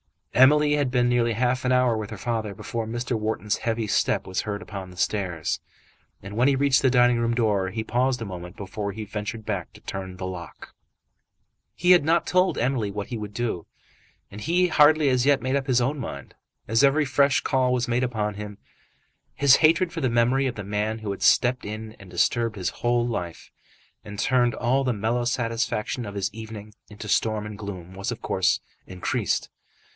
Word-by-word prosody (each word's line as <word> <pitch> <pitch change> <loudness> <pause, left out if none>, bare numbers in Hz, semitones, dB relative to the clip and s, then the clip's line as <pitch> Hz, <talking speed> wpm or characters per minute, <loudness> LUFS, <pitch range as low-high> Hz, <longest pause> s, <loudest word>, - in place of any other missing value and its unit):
Emily 145 +4 +5
had 145 -3 +1
been 125 -1 +2
nearly 120 -1 +2
half 125 +3 0
an 125 - +2
hour 125 -2 +3
with 110 -1 -4
her 110 - -7
father 110 -1 -3
before 115 +3 -4
Mr. 120 0 -2
Wharton's 105 -1 -1
heavy 115 -1 -2
step 105 - +1
was 95 0 -2
heard 105 -1 -4
upon 100 -3 -7
the 90 - -14
stairs. 90 -5 -1 0.6
And 100 +2 -8
when 120 +4 +3
he 140 - +4
reached 135 -1 +3
the 130 - +4
dining 120 -1 +4
room 115 0 0
door 105 -5 +1
he 110 +4 -4
paused 125 +2 0
a - - -5
moment 90 -2 -8
before 100 +1 -4
he 110 +1 -6
ventured 105 +1 -5
to 100 -5 -5
turn 95 -1 -6
the 95 - -5
lock. 90 -3 -8 1.0
He 180 +1 +3
had 180 -4 +7
not 165 +2 +2
told 185 +1 +2
Emily 120 -4 0
what 100 0 -5
he 120 - -4
would 105 -1 -7
do, 115 -9 -3 0.6
and 105 +2 -9
had 180 +6 +2
hardly 150 0 +5
as 125 0 +2
yet 140 -4 +3
made 130 +1 0
up 140 -1 -1
his 125 -2 +3
own 135 +4 -1
mind. 70 - -7 0.3
As 115 +5 +3
every 145 +2 +4
fresh 140 +1 +3
call 130 -1 +1
was 125 0 0
made 120 +1 +1
upon 110 -4 -1
him, 105 0 -8 0.8
his 140 -2 +6
hatred 165 +2 +3
for 165 - -4
the 130 - +1
memory 120 +3 +2
of 125 - -3
the 105 - -5
man 105 +2 -2
who 105 -2 -4
had 100 - -6
stepped 125 +1 +3
in 110 +1 -6
and 100 -2 -13
disturbed 115 +5 +1
his 95 -3 -2
whole 120 0 0
life, 90 -8 -5 0.5
and 105 0 -9
turned 120 +2 +2
all 130 +3 +1
the 125 -2 +1
mellow 115 +3 -1
satisfaction 115 -1 -1
of 100 - -7
his 100 0 -2
evening 110 -1 -9 0.2
into 105 0 -9
storm 110 0 +1
and 105 -1 -8
gloom, 95 -3 -7
was 95 +1 -4
of - - -7
course - - +1 0.3
increased. 90 -1 -2
115 Hz, 200 wpm, -25 LUFS, 105-130 Hz, 1.0 s, had